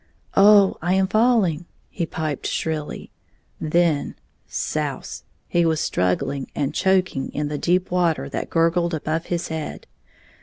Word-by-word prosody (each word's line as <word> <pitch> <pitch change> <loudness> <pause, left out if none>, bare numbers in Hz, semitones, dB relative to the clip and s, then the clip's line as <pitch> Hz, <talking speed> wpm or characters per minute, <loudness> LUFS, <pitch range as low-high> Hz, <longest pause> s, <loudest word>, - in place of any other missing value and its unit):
"Oh, 200 -1 +6
I 175 +3 +1
am 190 0 +3
falling!" 205 -6 +2 0.3
he 170 -3 -3
piped 155 -4 -3
shrilly. 155 -2 -3 0.5
Then 160 -2 +1 0.2
— - - -43
souse! - - -4
— - - -43
he 175 - +2
was 160 -2 +1
struggling 90 +10 -1
and 145 0 -1
choking 185 -8 +1
in 150 0 -2
the 150 -1 -3
deep 180 +1 +1
water 175 -3 +1
that - - -4
gurgled 170 +1 +2
above 160 +2 -3
his 175 -1 -2
head. 160 -2 -5
165 Hz, 145 wpm, -22 LUFS, 155-180 Hz, 0.5 s, Oh